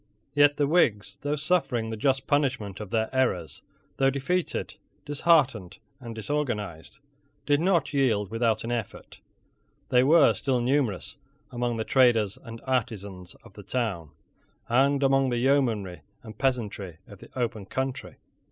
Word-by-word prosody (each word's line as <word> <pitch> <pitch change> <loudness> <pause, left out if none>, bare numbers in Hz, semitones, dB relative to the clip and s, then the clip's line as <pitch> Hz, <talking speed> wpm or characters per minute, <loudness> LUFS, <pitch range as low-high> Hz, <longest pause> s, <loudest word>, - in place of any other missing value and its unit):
Yet 145 0 +4
the 145 - +2
Whigs, 135 - +1
though 145 +1 -1
suffering 140 -8 0
the - - -3
just 135 +4 0
punishment 130 - 0
of 105 -3 -7
their 110 +1 0
errors, 120 -11 -1 0.4
though 135 0 +3
defeated, 140 +7 -2 0.3
disheartened, 140 - +2 0.2
and 115 -3 -8
disorganized, 110 - -3 0.5
did 145 0 +3
not 175 -4 +1
yield 110 -8 +1
without 115 -1 0
an 115 - -4
effort. 115 -4 -5 0.7
They 125 0 +4
were 160 +5 +6
still 130 -3 -1
numerous 125 -4 -1 0.3
among 120 -1 -2
the 110 - -1
traders 115 -6 +3
and 115 0 -9
artisans 100 -8 -3
of - - -16
the 105 - -11
towns, 100 - -3 0.6
and 135 +4 +2
among 135 -1 +3
the 120 - -1
yeomanry 115 - +1 0.2
and 110 -1 -10
peasantry 105 - -2
of 100 - -14
the - - -14
open 110 -5 -3
country. 130 +2 -4
120 Hz, 145 wpm, -26 LUFS, 105-140 Hz, 0.7 s, were